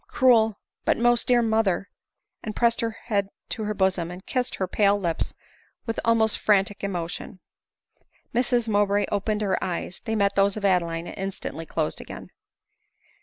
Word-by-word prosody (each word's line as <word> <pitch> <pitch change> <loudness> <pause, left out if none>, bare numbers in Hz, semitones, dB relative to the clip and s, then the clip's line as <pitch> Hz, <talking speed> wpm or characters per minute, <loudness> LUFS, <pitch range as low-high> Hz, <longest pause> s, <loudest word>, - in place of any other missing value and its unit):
Cruel, 225 -5 +4 0.3
but. - - +2
most 240 0 +3
dear 245 -1 +4
mother! 220 -4 +1
,v - - -57
and 215 - -4
pressed 235 -1 +2
her 230 - 0
head 205 -3 -2 0.2
to 220 - -3
her 210 0 -2
bosom, 190 -3 +1
and 180 +1 -9
kissed 255 -1 -1
her 190 - -2
pale 200 +1 +3
lips 170 -4 -2 0.5
with 225 - -2
almost 225 -2 +3
frantic 205 -1 +2
emotion. 180 -1 -4 0.9
Mrs 240 -1 +1
Mowbray 205 -1 +2
opened 210 +1 0
her 190 -2 0
eyes; 185 0 -3
they 225 - -2
met 200 -1 +2
those 200 +1 +2
of 205 - -2
Adeline, 170 -3 +1
and - - -8
instantly 185 -4 -5
closed 155 -2 -2
again. - - -10
205 Hz, 165 wpm, -25 LUFS, 190-225 Hz, 0.9 s, Cruel